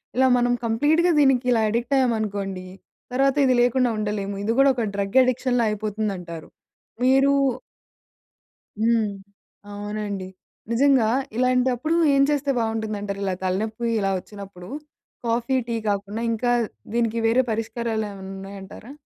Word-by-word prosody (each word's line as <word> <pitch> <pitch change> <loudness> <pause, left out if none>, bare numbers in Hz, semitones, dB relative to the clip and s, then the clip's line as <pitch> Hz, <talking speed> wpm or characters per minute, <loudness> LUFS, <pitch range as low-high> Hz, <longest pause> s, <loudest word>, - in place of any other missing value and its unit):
"ఇలా 260 +1 +4
మనం 245 0 +2
కంప్లీట్‌గా 300 +10 +3
దీనికి 270 -3 +4
ఇలా 230 -2 +3
అడిక్ట్ 235 +5 -1
అయ్యామనుకోండి, 205 -7 -1 0.5
తర్వాత 270 +1 +2
ఇది 260 - +4
లేకుండా 245 +1 +3
ఉండలేము. 205 -1 -2
ఇది 220 +2 +1
గూడా 275 0 +6
ఒక 235 -3 -1
డ్రగ్ 200 +4 -1
అడిక్షన్‌లా 250 -1 +1
అయిపోతుందంటారు." 200 -6 -4 0.5
మీరూ 270 +2 +4 1.4
హ్మ్. 225 -1 +2 0.6
అవునండి. 205 -2 -4 0.4
నిజంగా 260 -1 +4 0.3
ఇలాంటప్పుడు 255 +4 +1 0.2
ఏం 275 0 +5
చేస్తే 285 -1 +1
బావుంటుందంటారు? 215 -3 -3
ఇలా 190 -1 0
తలనొప్పి 215 +5 -2
ఇలా 195 -1 0
వచ్చినప్పుడు 195 -2 -11 0.6
కాఫీ, 235 +3 0
టీ 235 - -2
కాకుండా 200 +2 -2
ఇంకా 240 +2 0 0.4
దీనికి 230 -1 0
వేరే 235 +3 +4
పరిష్కారాలేవన్నా 220 -3 -3
ఉన్నాయంటారా? 195 +4 -10
225 Hz, 115 wpm, -23 LUFS, 205-250 Hz, 1.4 s, గూడా